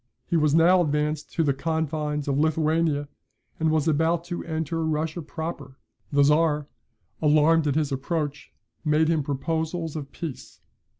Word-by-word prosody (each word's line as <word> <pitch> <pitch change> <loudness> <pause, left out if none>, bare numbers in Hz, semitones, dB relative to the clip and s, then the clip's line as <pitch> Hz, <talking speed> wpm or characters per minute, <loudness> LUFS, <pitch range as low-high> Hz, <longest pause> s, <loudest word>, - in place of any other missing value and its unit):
He - - -1
was 150 -2 +3
now 175 +3 +5
advanced 150 -1 -1
to 165 - +1
the 140 -3 +2
confines 150 0 -2
of 140 - +1
Lithuania, 155 -1 +1 0.5
and 160 0 +2
was 155 0 +1
about 160 +2 +2
to 175 0 -5
enter 160 0 -2
Russia 160 +2 -1
Proper: 150 -4 -6 0.3
the 145 -1 +4
Czar, 150 0 +3 0.5
alarmed 155 +1 +4
at 145 - +1
his 155 -3 0
approach, 145 +2 -3 0.3
made 155 0 +2
him 160 -2 +2
proposals 160 +3 -2
of 145 -3 -6
peace. 160 -6 -7
155 Hz, 145 wpm, -25 LUFS, 150-165 Hz, 0.5 s, now